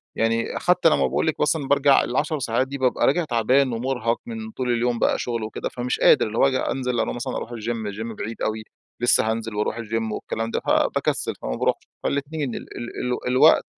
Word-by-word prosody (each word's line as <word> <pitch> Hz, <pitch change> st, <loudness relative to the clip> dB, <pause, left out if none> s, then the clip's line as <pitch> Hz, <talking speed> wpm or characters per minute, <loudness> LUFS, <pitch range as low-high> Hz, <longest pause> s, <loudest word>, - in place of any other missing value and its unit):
يعني 115 Hz, +1 st, 0 dB
حتى 180 Hz, -2 st, +4 dB
لما -, -, +2 dB
باقول -, -, 0 dB
لِك 160 Hz, -, -1 dB
مثلًا 150 Hz, -2 st, +1 dB
بارجع 140 Hz, -1 st, +4 dB
ال10 150 Hz, +4 st, -1 dB
ساعات 120 Hz, +2 st, 0 dB
دي 140 Hz, -, -5 dB
بابقى 130 Hz, -2 st, +2 dB
راجع 165 Hz, +5 st, +2 dB
تعبان 125 Hz, +1 st, +2 dB
ومرهق 120 Hz, -1 st, -1 dB
من 225 Hz, -2 st, -6 dB
طول 125 Hz, -, -2 dB
اليوم 120 Hz, 0 st, 0 dB
بقى -, -, +2 dB
شُغل 115 Hz, -2 st, -2 dB
وكده، 110 Hz, -, -4 dB
فمش 125 Hz, +1 st, -3 dB
قادر، -, -, +5 dB
اللي 110 Hz, +2 st, -5 dB
هو -, -, +5 dB
آجي 130 Hz, -1 st, +1 dB
أنزل 125 Hz, -3 st, -1 dB
أنا 110 Hz, -, 0 dB
مثلًا 120 Hz, -, -4 dB
أرُوح -, -, -4 dB
الGym 115 Hz, -2 st, -4 dB
الGym 110 Hz, +1 st, -5 dB
بعيد 115 Hz, +2 st, -6 dB
أوي، 110 Hz, 0 st, -2 dB, 0.4 s
لسه 120 Hz, -2 st, +4 dB
هانزل 115 Hz, -1 st, -4 dB
وأرُوح 105 Hz, +2 st, -1 dB
الGym 115 Hz, -1 st, -2 dB
والكلام 115 Hz, +1 st, -4 dB
ده، -, -, 0 dB
ف -, -, -6 dB
باكسل، -, -, +1 dB
فما -, -, -3 dB
بارُوحش -, -, 0 dB, 0.2 s
فالاتنين، 140 Hz, -2 st, -2 dB
ال -, -, -5 dB, 0.2 s
ال 120 Hz, -, -5 dB, 0.2 s
ال 125 Hz, -, -4 dB
الوقت 130 Hz, +1 st, +5 dB
120 Hz, 210 wpm, -23 LUFS, 115-135 Hz, 0.4 s, قادر